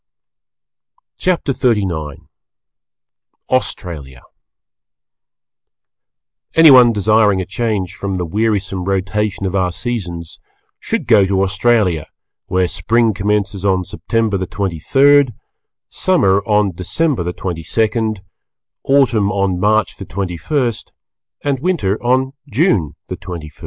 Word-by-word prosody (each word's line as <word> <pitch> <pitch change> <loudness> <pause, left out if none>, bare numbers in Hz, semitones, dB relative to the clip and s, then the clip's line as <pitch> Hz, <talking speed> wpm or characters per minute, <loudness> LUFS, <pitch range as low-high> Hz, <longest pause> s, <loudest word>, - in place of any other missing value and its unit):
CHAPTER 175 -6 0
XXXIX 95 - -1 1.2
AUSTRALIA 75 - -3 2.3
Anyone 130 -7 +8
desiring 105 -1 +3
a 95 - -2
change 100 -3 -2
from 100 -1 -4
the 90 -1 -2
wearisome 100 -1 -1
rotation 100 +1 -1
of 95 0 -2
our 90 -2 +1
seasons, 85 -8 -5 0.4
should - - -3
go 105 -5 +5
to 95 0 +1
Australia, 95 -5 +1 0.4
where 90 0 +1
Spring 115 +3 +1
commences 100 -1 -1
on 95 -2 +1
September 110 +1 -1
the 95 - -3
twenty 95 -4 -3
third, 140 - +4 0.5
Summer 100 - +2
on 105 -2 +2
December 120 - -1
the 90 +1 -2
twenty 90 -3 -5
second, 110 +3 -1 0.6
Autumn 125 -7 +2
on 95 -3 0
March 105 0 +1
the - - -8
twenty 90 -1 -4
first 120 - -2 0.5
and 140 -2 0
Winter 140 - -1
on 130 +2 +1 0.2
June 105 - +1
the - - -4
twenty 85 -4 -8
first. 80 - -26
100 Hz, 115 wpm, -17 LUFS, 95-120 Hz, 2.3 s, Anyone